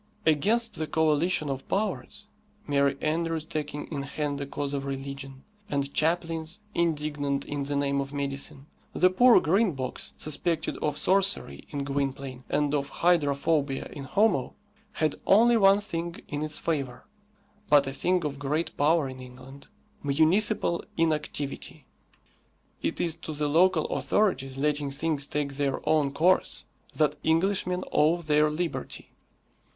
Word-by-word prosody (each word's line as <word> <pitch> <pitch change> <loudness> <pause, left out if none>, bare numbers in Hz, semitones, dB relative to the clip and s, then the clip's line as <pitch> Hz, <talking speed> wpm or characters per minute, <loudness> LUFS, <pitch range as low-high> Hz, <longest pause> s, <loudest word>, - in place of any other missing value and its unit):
Against 210 +10 +3
the 155 - -2
coalition 160 +1 +1
of 135 -1 -4
powers 210 +1 -2 0.4
merry 140 -2 +1
andrews 165 0 -1
taking 150 -2 -4
in 145 -3 -3
hand 145 0 -3
the 140 - -4
cause 140 0 -4
of 140 -1 -3
religion, 135 0 -6 0.3
and 140 -4 -2
chaplains, 165 +2 0
indignant 150 -4 -1
in 145 -1 -3
the 145 +1 -2
name 140 0 +1
of 135 0 -6
medicine 140 -1 -4 0.3
the 185 0 +4
poor 245 +6 +6
Green 190 +4 +2
Box, 130 -2 -5
suspected 160 +2 -1
of 150 -1 -2
sorcery 195 +5 +1
in 145 -2 -3
Gwynplaine 135 -2 -3
and 145 0 +1
of 140 -1 -1
hydrophobia 145 -4 +1
in 140 - -7
Homo, 180 - +1 0.4
had 155 -2 -1
only 235 +4 +6
one 195 -2 +5
thing 170 -4 -4
in 145 0 -4
its 155 -1 +1
favour 140 -6 -3 0.6
(but 145 -1 +6
a 135 - -4
thing 180 +3 +1
of 140 -2 -4
great 150 +4 -2
power 150 0 +2
in 130 -1 -8
England), 130 +2 -12 0.3
municipal 170 +6 +2
inactivity. 150 -3 -2 1.0
It - - -2
is 170 -2 0
to 155 - -6
the 150 0 -1
local 165 +2 +3
authorities 135 -11 0
letting 145 0 0
things 145 0 0
take 145 -2 -2
their 140 -2 0
own 150 -3 +3
course 175 +6 +2 0.3
that 150 -1 +1
Englishmen 180 +2 +1
owe 160 +3 +3
their 150 -2 +2
liberty. 165 +2 -4
150 Hz, 140 wpm, -27 LUFS, 140-170 Hz, 1.0 s, poor